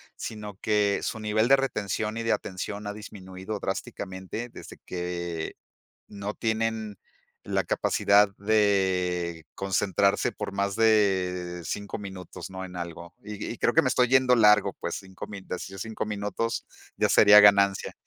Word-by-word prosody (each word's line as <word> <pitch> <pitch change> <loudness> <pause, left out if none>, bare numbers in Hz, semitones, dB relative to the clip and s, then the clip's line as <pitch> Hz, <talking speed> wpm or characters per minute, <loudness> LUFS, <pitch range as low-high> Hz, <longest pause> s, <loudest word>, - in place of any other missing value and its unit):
sino 105 -3 -7
que 105 -2 +2
su 110 - -3
nivel 110 +2 +1
de 135 - +7
retención 110 -4 -2
y 115 - -3
de 115 - +1
atención 100 +2 -3
ha 105 - -3
disminuido 100 -1 -7
drásticamente, 95 +3 -5
desde - - -11
que 85 -2 -4 0.5
no 100 +1 -5
tienen 110 -2 -2 0.5
la - - 0
capacidad 100 0 +3
de 95 -5 +1
concentrarse 100 0 +1
por 100 - -6
más 100 0 -1
de 95 -5 +2
5 100 +5 -4
minutos, 95 -3 -8
¿no? 95 0 -7
En 90 -1 -11
algo. 85 0 -7
Y 105 0 -6
y - - -11
creo 120 - +1
que 160 - +6
me 130 - +1
estoy 125 0 +3
yendo 130 0 +4
largo, 105 -2 +5
pues - - -3
5 95 -1 -9
min 100 -2 -9
de - - -3
así 95 +2 -8
5 110 +3 -4
minutos, 105 +2 -3 0.3
ya - - +2
sería 105 0 +8
ganancia. 100 -1 +4
100 Hz, 155 wpm, -27 LUFS, 95-110 Hz, 0.5 s, sería